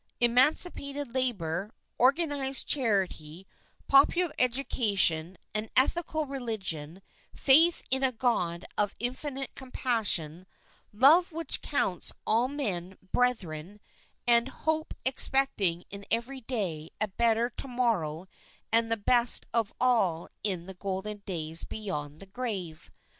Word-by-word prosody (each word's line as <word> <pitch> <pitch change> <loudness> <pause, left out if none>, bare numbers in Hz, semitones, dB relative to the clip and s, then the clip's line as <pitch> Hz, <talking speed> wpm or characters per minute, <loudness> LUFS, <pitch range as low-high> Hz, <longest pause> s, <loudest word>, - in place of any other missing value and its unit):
emancipated 280 +2 +2
labour, 200 -8 -2 0.3
organised 275 0 +3
charity, 190 - -1 0.4
popular 295 +5 +3
education, 205 -9 +1 0.2
an 215 +1 -3
ethical 310 +3 +2
religion, 195 - -5 0.3
faith 320 +5 +4
in 265 +1 +1
a 265 - +2
God 200 -8 -2
of 205 -1 0
infinite 265 +3 -5
compassion, 205 - 0 0.4
love 300 - +5
which 330 0 -1
counts 185 - 0
all 230 +3 +2
men 190 -10 -4
brethren, 200 -7 -2 0.5
and 235 0 +5
hope 315 +3 -3
expecting 255 -10 +3
in 200 0 -8
every 245 +4 -1
day 185 -11 -4
a 215 - 0
better 230 +3 0
to - - -4
morrow 205 - -2 0.5
and 230 0 +4
the 225 - +1
best 240 +3 +4
of 230 -2 -1
all 195 -10 +1 0.2
in 185 -5 -2
the 190 - -9
golden 195 +2 -5
days 165 -3 +1
beyond 150 -8 -6
the - - -10
grave. 195 -7 -6
230 Hz, 115 wpm, -28 LUFS, 185-265 Hz, 0.5 s, love